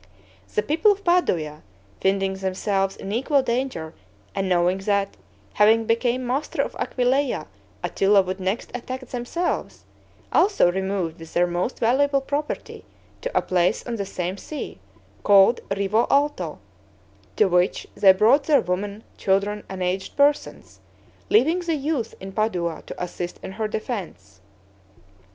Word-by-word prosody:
The 210 Hz, -, +2 dB
people 330 Hz, -, +3 dB
of 400 Hz, 0 st, -13 dB
Padua, 165 Hz, -, +1 dB, 0.4 s
finding 195 Hz, 0 st, +1 dB
themselves 195 Hz, +1 st, -1 dB
in 195 Hz, -, -6 dB
equal 270 Hz, +5 st, +2 dB
danger, 235 Hz, -10 st, -2 dB, 0.4 s
and 195 Hz, -1 st, -1 dB
knowing 180 Hz, +1 st, +2 dB
that, 200 Hz, 0 st, 0 dB, 0.4 s
having 220 Hz, +2 st, +4 dB
became 240 Hz, +3 st, +1 dB
master 265 Hz, +5 st, -1 dB
of -, -, -6 dB
Aquileia, 250 Hz, -, 0 dB, 0.4 s
Attila 195 Hz, 0 st, +3 dB
would 185 Hz, +1 st, -4 dB
next 190 Hz, +5 st, -2 dB
attack 255 Hz, +2 st, -5 dB
themselves, 250 Hz, +9 st, -3 dB, 0.5 s
also 385 Hz, -, +4 dB
removed 190 Hz, -3 st, -2 dB
with 165 Hz, 0 st, -11 dB
their 175 Hz, -, +4 dB
most 175 Hz, +7 st, -2 dB
valuable 275 Hz, +4 st, +3 dB
property 285 Hz, +3 st, -4 dB, 0.4 s
to -, -, -2 dB
a -, -, +2 dB
place 180 Hz, -1 st, +1 dB
on 235 Hz, -1 st, -3 dB
the 200 Hz, -, -2 dB
same 180 Hz, 0 st, -3 dB
sea, 300 Hz, +8 st, -7 dB, 0.4 s
called 200 Hz, +3 st, +6 dB
Rivo 200 Hz, +3 st, +1 dB
Alto, 280 Hz, -, +1 dB, 0.8 s
to 215 Hz, -, +4 dB
which 180 Hz, 0 st, +1 dB
they 195 Hz, -, +7 dB
brought 225 Hz, +9 st, +4 dB
their 295 Hz, -3 st, +4 dB
women, 200 Hz, +4 st, -3 dB, 0.2 s
children, 200 Hz, +2 st, +1 dB
and 190 Hz, -1 st, -4 dB
aged 185 Hz, +1 st, -3 dB
persons, 285 Hz, +1 st, +1 dB, 0.5 s
leaving 365 Hz, -5 st, +4 dB
the 340 Hz, -2 st, -1 dB
youth 285 Hz, -5 st, -2 dB
in 190 Hz, 0 st, -8 dB
Padua 180 Hz, -6 st, -1 dB
to -, -, -8 dB
assist 175 Hz, 0 st, -5 dB
in -, -, -6 dB
her 215 Hz, +2 st, -2 dB
defense. 170 Hz, -, -6 dB
205 Hz, 140 wpm, -23 LUFS, 185-260 Hz, 0.8 s, they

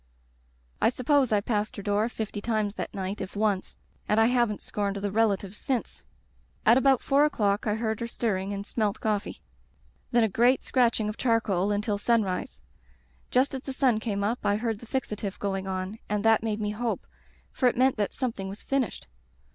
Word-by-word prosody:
"I -, -, +5 dB
suppose 255 Hz, +1 st, +2 dB
I 210 Hz, -1 st, +3 dB
passed 210 Hz, 0 st, -1 dB
her 200 Hz, -, -7 dB
door 210 Hz, +3 st, +1 dB
fifty 220 Hz, -3 st, -5 dB
times 215 Hz, -2 st, 0 dB
that -, -, -5 dB
night, 195 Hz, +1 st, -4 dB
if 190 Hz, -, -6 dB
once, 205 Hz, -2 st, 0 dB, 0.3 s
and 210 Hz, -, +3 dB
I 225 Hz, -, +6 dB
haven't 240 Hz, -3 st, +1 dB
scorned 200 Hz, -1 st, -2 dB
the 200 Hz, 0 st, -2 dB
relatives 205 Hz, -2 st, +1 dB
since. 260 Hz, -4 st, -3 dB, 0.6 s
"At 230 Hz, -, +7 dB
about 265 Hz, 0 st, +4 dB
four 280 Hz, +1 st, +4 dB
o'clock 210 Hz, -8 st, +1 dB
I 210 Hz, -, +2 dB
heard 220 Hz, -1 st, -2 dB
her 235 Hz, -, -3 dB
stir 230 Hz, -2 st, -1 dB
ring 190 Hz, +1 st, -3 dB
and 200 Hz, 0 st, -4 dB
smelt 215 Hz, -2 st, -1 dB
coffee. 210 Hz, -2 st, -2 dB, 0.7 s
Then 235 Hz, -1 st, +3 dB
a -, -, +4 dB
great 240 Hz, +6 st, +3 dB
scratch 245 Hz, -3 st, +2 dB
ing 215 Hz, -, -1 dB
of 210 Hz, -, -4 dB
charcoal 210 Hz, -5 st, +1 dB
until 205 Hz, 0 st, 0 dB
sunrise. 205 Hz, -5 st, 0 dB, 0.7 s
Just 260 Hz, +3 st, +2 dB
as 265 Hz, -, -3 dB
the 270 Hz, -, -6 dB
sun 255 Hz, -4 st, +2 dB
came 205 Hz, -3 st, -2 dB
up 225 Hz, +4 st, 0 dB
I 205 Hz, -, +2 dB
heard 220 Hz, -1 st, -2 dB
the 235 Hz, -, -12 dB
fixatif 210 Hz, -6 st, -3 dB
going 195 Hz, -1 st, -2 dB
on, 190 Hz, +3 st, -4 dB
and 210 Hz, +1 st, -1 dB
that 225 Hz, -1 st, +5 dB
made 215 Hz, -1 st, -2 dB
me 210 Hz, 0 st, -1 dB
hope, 215 Hz, -3 st, -2 dB, 0.5 s
for 255 Hz, -, +2 dB
it -, -, -5 dB
meant 260 Hz, 0 st, +3 dB
that 205 Hz, -1 st, 0 dB
something 225 Hz, -7 st, -3 dB
was 200 Hz, +3 st, -9 dB
finished. 270 Hz, -6 st, -1 dB
215 Hz, 195 wpm, -27 LUFS, 205-240 Hz, 0.7 s, At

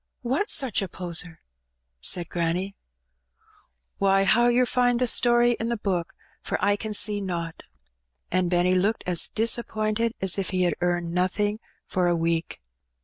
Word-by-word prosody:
"What's 270 Hz, -, +1 dB
such 260 Hz, -8 st, +1 dB
a 195 Hz, -, -3 dB
poser?" 175 Hz, -2 st, -3 dB, 0.6 s
said 170 Hz, -, -1 dB
granny. 175 Hz, +4 st, -2 dB, 1.2 s
"Why, 195 Hz, 0 st, +3 dB
how 220 Hz, +5 st, +4 dB
yer 245 Hz, +1 st, +3 dB
find 245 Hz, 0 st, +1 dB
the 250 Hz, -, +1 dB
story 240 Hz, 0 st, +4 dB
in 225 Hz, -, -2 dB
the 235 Hz, -, -1 dB
book; 195 Hz, -3 st, -3 dB, 0.3 s
for -, -, -2 dB
I 205 Hz, 0 st, +2 dB
can 215 Hz, 0 st, -5 dB
see 205 Hz, 0 st, +1 dB
nowt." 170 Hz, -4 st, -5 dB, 0.7 s
And 185 Hz, -1 st, +1 dB
Benny 180 Hz, +1 st, +2 dB
looked 200 Hz, +4 st, +1 dB
as 180 Hz, -2 st, +2 dB
disappointed 225 Hz, 0 st, -1 dB
as 190 Hz, 0 st, +1 dB
if 195 Hz, -, -2 dB
ha 185 Hz, -1 st, 0 dB
had 175 Hz, -, +2 dB
earned 175 Hz, -1 st, -1 dB
nothing 205 Hz, +4 st, 0 dB, 0.3 s
for 180 Hz, -1 st, 0 dB
a 175 Hz, -, +2 dB
week. 165 Hz, -, -2 dB
195 Hz, 155 wpm, -25 LUFS, 175-225 Hz, 1.2 s, how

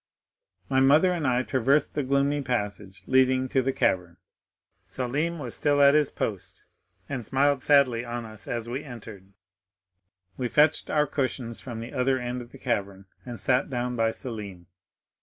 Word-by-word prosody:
"My 130 Hz, -1 st, +2 dB
mother 150 Hz, +7 st, +5 dB
and 165 Hz, -5 st, -1 dB
I 125 Hz, 0 st, +2 dB
traversed 135 Hz, +4 st, +1 dB
the 150 Hz, -, -1 dB
gloomy 140 Hz, +2 st, +1 dB
passage 105 Hz, -6 st, -4 dB
leading 130 Hz, 0 st, +3 dB
to 130 Hz, -, +2 dB
the 135 Hz, +1 st, 0 dB
cavern. 90 Hz, -8 st, 0 dB, 0.7 s
Selim 145 Hz, +7 st, -2 dB
was 125 Hz, -7 st, -5 dB
still 145 Hz, -1 st, +1 dB
at 140 Hz, 0 st, +7 dB
his 150 Hz, -2 st, +3 dB
post, 100 Hz, -4 st, -5 dB, 0.4 s
and 130 Hz, -4 st, -4 dB
smiled 140 Hz, +3 st, +1 dB
sadly 130 Hz, -5 st, +3 dB
on 120 Hz, -1 st, -5 dB
us 110 Hz, -1 st, -13 dB
as 115 Hz, -1 st, -3 dB
we 130 Hz, +4 st, -4 dB
entered. 110 Hz, -7 st, -11 dB, 1.1 s
We 125 Hz, -, -1 dB
fetched 150 Hz, +3 st, +3 dB
our 150 Hz, -1 st, +2 dB
cushions 130 Hz, -5 st, -3 dB
from 120 Hz, -3 st, -7 dB
the 115 Hz, -, -8 dB
other 130 Hz, +1 st, +1 dB
end 125 Hz, 0 st, -4 dB
of 120 Hz, -, -12 dB
the -, -, -12 dB
cavern, 100 Hz, -6 st, -3 dB, 0.2 s
and 120 Hz, -2 st, -6 dB
sat 125 Hz, -, +1 dB
down 125 Hz, -1 st, -2 dB
by 115 Hz, -1 st, +2 dB
Selim. 105 Hz, -7 st, -7 dB
125 Hz, 165 wpm, -26 LUFS, 115-140 Hz, 1.1 s, at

